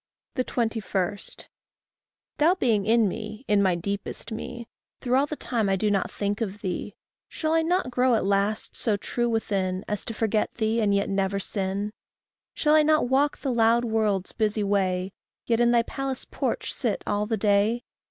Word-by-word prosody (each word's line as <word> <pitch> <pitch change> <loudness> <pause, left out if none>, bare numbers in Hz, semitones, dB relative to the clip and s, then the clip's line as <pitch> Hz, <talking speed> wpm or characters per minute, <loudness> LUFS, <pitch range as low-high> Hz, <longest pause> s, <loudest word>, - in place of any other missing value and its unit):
21. 225 -6 -1 1.2
Thou 330 +5 +5
being 220 - +1
in 225 -1 +4
me, 215 +5 -6
in 205 -1 +4
my 190 -3 +3
deepest 200 +6 -5
me, 230 +1 -6 0.3
Through 250 -1 -2
all 275 +2 +3
the 305 - -4
time 230 -8 -1
I 195 - +3
do 210 +2 +1
not 195 -2 +1
think 205 +2 -2
of 205 -2 -3
thee, 190 +2 -4 0.3
Shall 315 0 -1
I 325 - +4
not 340 -4 0
grow 250 0 +3
at 215 - 0
last 200 +2 0
so 215 -3 +2
true 240 +4 -1
within 195 -4 -1
As 210 -2 -3
to 225 - -5
forget 215 -1 0
thee 225 0 +1
and 200 -2 +3
yet 200 - +1
never 195 0 0
sin? 200 +1 -2 0.6
Shall 300 -1 +2
I 310 - +7
not 305 -4 +3
walk 280 +3 +2
the 265 -3 -2
loud 235 +1 +3
world's 215 -4 0
busy 215 -1 0
way, 190 -2 0 0.3
Yet 230 -1 +1
in 240 0 +4
thy 240 -1 +4
palace 270 +1 -4
porch - - -2
sit - - -2
all 205 0 0
the 225 0 0
day? 210 +3 +2
215 Hz, 180 wpm, -26 LUFS, 200-240 Hz, 1.2 s, I